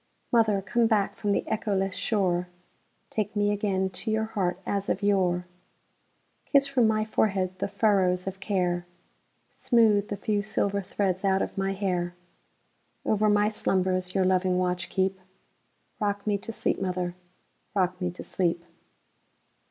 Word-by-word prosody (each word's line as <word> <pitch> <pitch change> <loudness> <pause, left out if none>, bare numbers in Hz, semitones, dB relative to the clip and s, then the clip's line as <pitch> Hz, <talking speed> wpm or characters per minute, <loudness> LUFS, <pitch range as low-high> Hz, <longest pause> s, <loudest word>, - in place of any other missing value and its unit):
Mother, 215 -4 +3
come 235 +4 +2
back 210 -3 +1
from 205 - -1
the - - +1
echoless 195 -3 0
shore, 180 -5 0 0.6
Take 215 0 -2
me 205 0 +2
again 195 -2 0
to 185 +5 -5
your 220 0 +1
heart 190 -5 -1
as 200 -1 -1
of 200 - -1
yore; 180 -3 +2 1.0
Kiss 280 -2 +4
from 265 -5 +3
my 215 0 +1
forehead 190 -4 0
the - - 0
furrows 195 -3 +2
of 190 0 -5
care, 180 -3 -1 0.6
Smooth 215 -4 +3
the 205 - -4
few 205 +1 0
silver 200 -1 0
threads 190 0 -1
out 195 -1 +2
of - - -5
my 195 0 0
hair; 180 -3 -1 0.9
Over 215 0 +2
my 205 0 +4
slumbers 185 -3 0
your 190 -1 +3
loving 185 0 +2
watch 180 -1 -1
keep;—Rock 190 +2 -4
me 205 -1 +1
to 225 - -6
sleep, 220 - -1
mother,—rock 180 +1 -4
me 180 - 0
to 180 - -8
sleep! 170 -2 -1
195 Hz, 145 wpm, -27 LUFS, 185-210 Hz, 1.0 s, Kiss